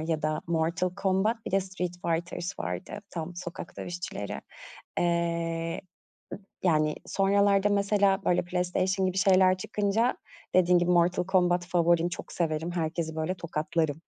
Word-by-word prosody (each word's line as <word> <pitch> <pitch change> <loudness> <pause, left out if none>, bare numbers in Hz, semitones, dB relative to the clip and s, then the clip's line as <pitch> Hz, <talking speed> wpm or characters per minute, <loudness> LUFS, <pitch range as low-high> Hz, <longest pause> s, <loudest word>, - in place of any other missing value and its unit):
ya 160 -1 -2
da 155 0 0
Mortal 170 +2 0
Combat, 195 +4 +2
bir - - -3
de 195 +1 +3
Street 185 -2 -4
Fighters 170 +2 -2
vardı, 205 - -4
tam 170 +1 -5
sokak 175 -1 -7
dövüşçüleri. 175 - -5 0.6
Eee, 170 -1 0 0.8
yani, 155 -3 +3
sonralarda 200 0 +3
mesela, 200 -1 +2
böyle, 180 - +3
PlayStation 185 +2 0
gibi 185 0 -2
şeyler 185 -1 +5
çıkınca, 210 +5 0 0.4
dediğin 180 -1 +5
gibi 175 +1 +1
Mortal 175 +1 +3
Combat 180 -2 +2
favorim 170 -1 +3
çok 175 - -7
severim, 165 0 -1
herkesi, 160 -1 -2
böyle, 160 +4 -1
tokatlarım 160 -2 -2
175 Hz, 130 wpm, -28 LUFS, 165-190 Hz, 0.8 s, şeyler